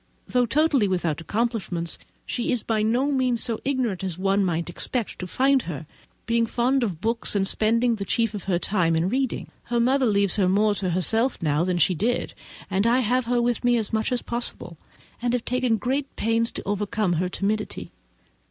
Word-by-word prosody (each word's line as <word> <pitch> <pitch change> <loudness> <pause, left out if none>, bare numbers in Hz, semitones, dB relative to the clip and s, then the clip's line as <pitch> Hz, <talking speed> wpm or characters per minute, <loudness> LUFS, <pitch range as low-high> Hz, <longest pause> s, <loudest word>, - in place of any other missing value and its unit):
Though 250 -1 +2
totally 285 -4 +3
without 175 -5 -1
accomplishments, 195 -4 -2 0.3
she 240 - -2
is 245 - 0
by 220 -2 0
no 245 +6 +1
means 255 -4 +2
so 230 -2 -1
ignorant 250 -9 -1
as 180 -3 -3
one 195 +1 +2
might 170 -2 -1
expect 220 +6 -3
to 180 - -4
find 265 +7 +3
her, 155 -1 -5 0.4
being 230 0 +1
fond 255 +4 +1
of 185 -8 -2
books 230 -1 -1
and 195 -1 +2
spending 230 +4 +2
the 200 - -3
chief 225 +2 0
of 205 - -6
her 185 -3 +1
time 175 -3 +1
in 165 +3 +1
reading. 260 +2 -2
Her 240 0 0
mother 260 +2 +3
leaves 200 -2 +2
her 190 -3 +3
more 210 +2 +3
to 190 -2 -2
herself 225 +8 +2
than 170 +3 0
she 185 - +3
did, 230 +8 -1 0.3
and 195 +4 +1
I 245 +2 +4
have 250 +1 +1
her 245 0 +2
with 240 0 0
me 245 0 +3
as 220 -2 -3
much 220 +2 0
as 250 - -1
possible, 235 -7 -4 0.5
and 240 0 0
have 245 -2 -1
taken 250 -2 +1
great 270 +5 -2
pains 230 +1 +1
to - - -6
overcome 205 -1 0
her 180 - -1
timidity. 210 +3 -3
220 Hz, 195 wpm, -24 LUFS, 190-245 Hz, 0.5 s, I